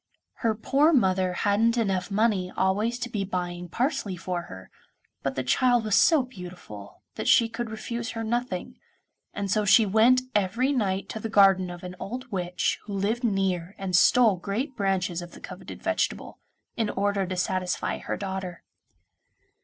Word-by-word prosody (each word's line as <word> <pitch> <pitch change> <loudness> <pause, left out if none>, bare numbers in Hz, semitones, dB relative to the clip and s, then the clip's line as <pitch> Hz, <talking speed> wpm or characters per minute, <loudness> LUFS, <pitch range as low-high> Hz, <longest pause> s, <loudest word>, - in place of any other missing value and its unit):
Her 225 -2 0
poor 275 +8 +3
mother 185 -7 +2
hadn't 215 +5 +2
enough 195 -5 0
money 200 -3 +1
always 210 +5 +1
to 245 - -4
be 210 -4 -3
buying 180 -2 -4
parsley 235 - -1
for 180 0 -3
her, 95 0 -11 0.5
but 135 -1 -2
the 130 - -2
child 245 - +3
was 215 -2 -2
so 315 -5 +5
beautiful 180 - -11
that - - -5
she 230 - +5
could 230 0 -5
refuse 230 +1 -5
her 225 - -2
nothing, 235 -4 -3 0.6
and 200 -2 -3
so 210 +2 +2
she 215 +2 +6
went 230 +5 +4
every 210 +7 +1
night 195 -6 -1
to 220 - -5
the 225 - -4
garden 195 -3 +5
of 175 0 -9
an 180 0 -7
old 250 +4 -6
witch 180 -2 -1
who 205 - -6
lived 210 +5 -1
near 195 -4 -1
and 190 -2 -2
stole 220 +2 +5
great 220 - -3
branches 190 -4 -1
of 175 0 -10
the - - -12
coveted - - -10
vegetable, - - -2 0.4
in 225 -2 -1
order 200 -1 0
to 185 0 -4
satisfy 185 0 -1
her - - -4
daughter. 190 -3 -5
200 Hz, 170 wpm, -26 LUFS, 185-230 Hz, 0.6 s, she